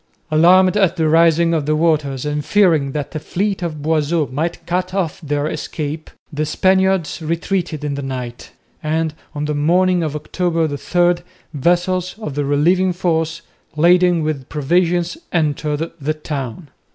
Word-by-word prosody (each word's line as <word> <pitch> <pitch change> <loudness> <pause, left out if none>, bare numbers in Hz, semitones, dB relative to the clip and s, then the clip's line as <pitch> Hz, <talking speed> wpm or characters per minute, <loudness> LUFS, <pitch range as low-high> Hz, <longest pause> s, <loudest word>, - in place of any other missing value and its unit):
Alarmed 185 +4 +5
at 190 -3 +3
the 160 -3 +1
rising 165 +1 +4
of 155 -3 -1
the 155 - +2
waters 150 -4 0
and 150 0 -2
fearing 160 -5 +3
that 150 -2 -4
the 155 - -4
fleet 195 +5 -2
of 155 -4 -4
Boisot 155 -2 0
might 160 +5 -3
cut 180 +1 -2
off 175 -6 -2
their 145 -1 -1
escape, 155 0 -4 0.2
the 150 +1 -1
Spaniards 190 +2 +1
retreated 170 -1 -2
in 145 -1 -2
the 140 - -4
night; 125 -3 -6 0.3
and 160 0 -1 0.2
on 145 0 -2
the 150 - -1
morning 175 +5 +2
of 155 -2 -2
October 165 +2 -1
3 145 -2 -3 0.4
the 175 - -11 0.3
vessels 175 +5 0
of 185 -10 -6
the 145 +1 -1
relieving 175 +6 +2
force, 165 -2 -1 0.3
laden 175 +1 +4
with 145 -4 -3
provisions, 175 - 0
entered 155 -1 -1
the 155 +3 -1
town. 145 -1 -6
160 Hz, 155 wpm, -19 LUFS, 150-175 Hz, 0.4 s, Alarmed